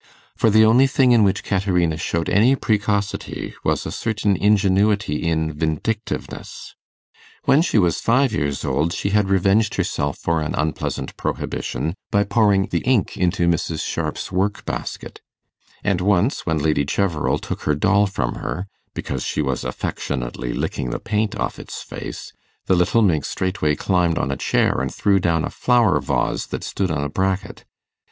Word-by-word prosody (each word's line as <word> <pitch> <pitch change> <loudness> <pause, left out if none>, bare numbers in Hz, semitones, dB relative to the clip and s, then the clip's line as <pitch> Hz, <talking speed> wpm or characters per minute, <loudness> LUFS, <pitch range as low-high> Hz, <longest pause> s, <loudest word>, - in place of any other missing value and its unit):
For 115 - +3
the 110 +1 +6
only 125 +5 +5
thing 135 -2 +3
in 115 -3 +5
which 100 0 +1
Caterina 90 -5 +1
showed 85 +1 -2
any 115 +8 +4
precocity 105 -4 -1
was - - 0
a - - -4
certain 105 -3 0
ingenuity 100 -3 +2
in 80 -1 0
vindictiveness. 80 +8 -4 0.7
When 140 - +4
she 165 - +1
was 90 -5 +2
five 125 +1 +2
years 70 -7 -1
old 80 +4 0
she 100 0 -2
had 105 -1 +2
revenged 95 +3 +2
herself - - -1
for 85 -1 0
an 75 - -2
unpleasant 75 0 -2
prohibition 80 - -3 0.2
by 100 0 +3
pouring 100 -2 +3
the 85 - 0
ink 125 -3 +1
into 90 0 +1
Mrs. 85 -1 0
Sharp's - - -3
work 95 +2 -1
basket; - - -5 0.6
and 100 -3 +1
once, 100 +5 +1
when 80 -1 +1
Lady 75 -1 +1
Cheverel 80 +1 0
took - - -6
her 75 - +2
doll 105 +7 +3
from 65 -11 -2
her, 90 +4 -4 0.3
because - - -3
she 75 - -1
was 65 -3 -2
affectionately 60 -1 -4
licking 60 - -3
the - - -3
paint 105 0 -1
off - - -3
its - - -7
face, - - -8 0.3
the 95 - +3
little 90 +6 +3
minx 80 -8 +2
straightway 95 -5 -1
climbed 90 -2 +1
on 70 - -1
a - - -1
chair - - +1
and - - -2
threw 100 -2 +2
down 85 -3 +1
a - - -5
flower 120 -6 +3
vase - - -1
that - - -5
stood 95 -2 -2
on 75 -3 -1
a 70 - -2
bracket. 95 +4 -2
95 Hz, 165 wpm, -21 LUFS, 80-105 Hz, 0.7 s, the